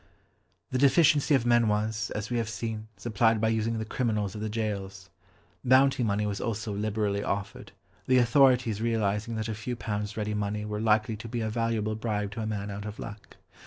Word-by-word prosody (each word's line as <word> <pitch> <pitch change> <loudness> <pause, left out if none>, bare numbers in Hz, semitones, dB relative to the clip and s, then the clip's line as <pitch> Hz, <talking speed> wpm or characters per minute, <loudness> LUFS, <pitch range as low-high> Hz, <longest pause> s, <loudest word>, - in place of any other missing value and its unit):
The 130 - 0
deficiency 145 +2 +5
of 125 -3 +1
men 120 -1 +4
was, 110 +1 0
as 105 +2 -4
we 120 - +1
have 115 -2 -1
seen, 110 -1 -4
supplied 110 +2 +2
by 110 +1 +2
using 110 +1 0
the 110 - -3
criminals 105 -4 -1
of 105 - -6
the 110 - -2
gaols. 100 -3 -4 0.5
Bounty 130 +1 +4
money 105 -2 +1
was 100 -1 -3
also 110 -2 -3
liberally 105 -1 -1
offered, 100 0 -4 0.4
the 130 - +4
authorities 125 -3 +4
realising 110 -1 0
that 110 0 -2
a 110 - -2
few 110 +3 -4
pounds 105 -2 -4
ready 105 -1 -2
money 105 0 -2
were 105 0 -3
likely 110 0 +2
to 105 - -8
be 115 +1 -3
a 110 -1 -2
valuable 115 -2 0
bribe 105 -2 -2
to 110 - -5
a 110 - -2
man 105 -1 -3
out 100 +1 -6
of 105 0 -6
luck. 105 0 -9
110 Hz, 200 wpm, -28 LUFS, 105-115 Hz, 0.5 s, deficiency